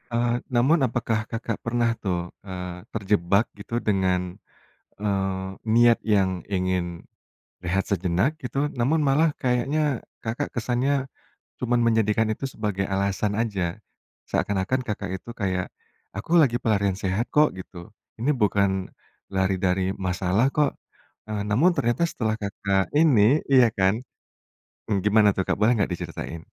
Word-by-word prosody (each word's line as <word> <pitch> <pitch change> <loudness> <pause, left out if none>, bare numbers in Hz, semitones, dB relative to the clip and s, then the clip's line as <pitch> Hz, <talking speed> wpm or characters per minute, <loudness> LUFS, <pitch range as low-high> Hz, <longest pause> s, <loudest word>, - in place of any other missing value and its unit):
Eee, 120 0 +1 0.2
namun 140 +8 +4
apakah 115 -1 -1
Kakak 115 -1 -4
pernah 120 0 0
tuh, 90 -3 -2 0.2
eee, 90 -1 -7
terjebak 100 0 +2
gitu, 100 - -10
dengan, 90 -3 0 0.6
eee, 95 -2 -1 0.3
niat 120 0 +6
yang 100 -3 +3 0.2
ingin 90 -3 -2 0.6
rehat 95 +2 0
sejenak 95 - +1
gitu, 140 0 -2
namun 145 +7 +2
malah 145 +3 +3
kayaknya 135 +2 0 0.2
Kakak 110 +1 -3
kesannya 130 +3 0 0.5
cuman 120 -1 +1
menjadikan 110 -1 +2
itu 135 +5 -5
sebagai 105 -5 -3
alasan 100 +2 0
aja. 100 -7 -1 0.6
Seakan-akan 100 +6 0
Kakak 105 -5 -4
itu - - -13
kayak, 95 -3 -1 0.5
"Aku 165 +11 +3
lagi 120 -5 +3
pelarian 100 -5 0
sehat 100 +4 -1
kok," 150 0 +3
gitu. 90 0 -10 0.2
"Ini 130 +7 +1
bukan 100 -5 +1 0.4
lari 95 0 +1
dari 95 0 +1
masalah 95 +5 +1
kok," 145 0 +1 0.6
eee, 105 -1 -2
namun 130 - +4
ternyata 120 +8 +1
setelah 110 -9 -2
Kakak 100 -2 -1
ini 145 -3 +5
iya 125 -3 +7
kan, 95 +1 +4 0.9
mmm, 100 -3 +1
gimana 105 0 +5
tuh, - - 0
Kak, - - 0
boleh 105 +4 +4
nggak 100 - +1
diceritain? 80 -1 -6
105 Hz, 135 wpm, -25 LUFS, 95-120 Hz, 0.9 s, iya